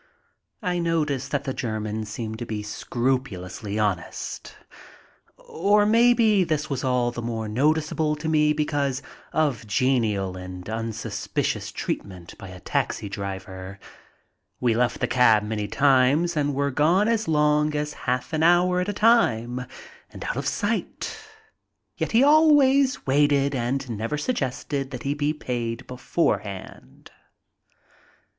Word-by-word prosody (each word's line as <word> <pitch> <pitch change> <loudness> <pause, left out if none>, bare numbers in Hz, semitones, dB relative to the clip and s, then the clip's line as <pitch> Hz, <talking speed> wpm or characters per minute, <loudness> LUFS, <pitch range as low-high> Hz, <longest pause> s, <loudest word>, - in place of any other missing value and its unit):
I 180 -2 0
notice 155 -5 0
that 140 -1 -2
the 135 - -3
Germans 110 -2 -3
seem 110 0 -5
to 120 - -5
be 105 -1 -4
scrupulously 105 -4 -3
honest, 100 -6 -3 0.8
or 205 +5 +2
maybe 225 -2 +4
this 155 -3 -2
was 135 -2 -2
all 125 -2 +1
the 120 - -6
more 115 -2 -3
noticeable 150 +5 +1
to 150 +1 -6
me 150 -1 +3
because 145 -3 -1 0.3
of 145 -8 0
genial 105 -5 +1
and 90 0 -8
unsuspicious 115 0 -3
treatment 90 -3 -5
by 100 - -9
a 90 0 -10
taxi 100 - -2
driver. 95 -1 -6 0.8
We 120 -2 +2
left 120 +1 0
the - - +3
cab 110 -4 +4
many 105 -1 -3
times 140 +6 +3
and 145 -2 0
were 140 0 0
gone 170 +10 +3
as 225 -2 0
long 150 -1 +2
as 150 0 -2 0.2
half 130 +5 -1
an 155 - 0
hour 175 +2 +4
at 180 - -2
a - - -1
time, 125 - +2 0.4
and - - -9
out - - -3
of - - -3
sight, - - -2 0.8
yet - - -3
he 230 +3 +5
always 280 -3 +5
waited 140 0 +3
and 130 +2 -2
never 115 +5 -3
suggested 140 - -2
that 125 -3 -7
he 140 - 0
be 145 0 0
paid 120 -5 -4
beforehand. 125 - -3
135 Hz, 135 wpm, -24 LUFS, 110-155 Hz, 0.8 s, he